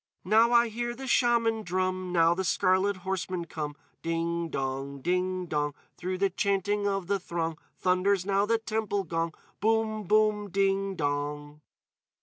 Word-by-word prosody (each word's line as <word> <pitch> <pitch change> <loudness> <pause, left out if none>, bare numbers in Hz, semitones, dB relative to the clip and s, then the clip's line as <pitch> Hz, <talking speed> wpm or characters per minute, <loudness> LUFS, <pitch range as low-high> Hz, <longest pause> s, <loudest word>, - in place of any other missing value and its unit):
_ - - -12
Now 225 +4 +5
I 235 -1 +5
hear 240 +2 -3
the 265 +2 -7
Shaman 235 -3 +3
drum; 185 -1 -1
Now 165 -1 +4
the 190 +2 -2
scarlet 190 +2 +2
horsemen 185 -2 -2
come; 150 -3 -5 0.3
Ding 165 0 -1
dong! 135 0 -3
Ding 180 +4 0
dong! 150 -3 -1 0.2
Through 185 +1 -3
the 195 0 +1
chanting 200 +2 0
of 195 -2 -1
the 200 +2 0
throng 165 -3 -3 0.2
Thunders 185 +1 +2
now 200 +1 +2
the 230 +1 +3
temple 220 -3 -2
gong. 165 -2 -2 0.3
Boom 220 0 +1
boom! 210 +1 +2
_Ding 195 0 +1
dong! 145 0 -3
185 Hz, 150 wpm, -28 LUFS, 170-210 Hz, 0.3 s, Now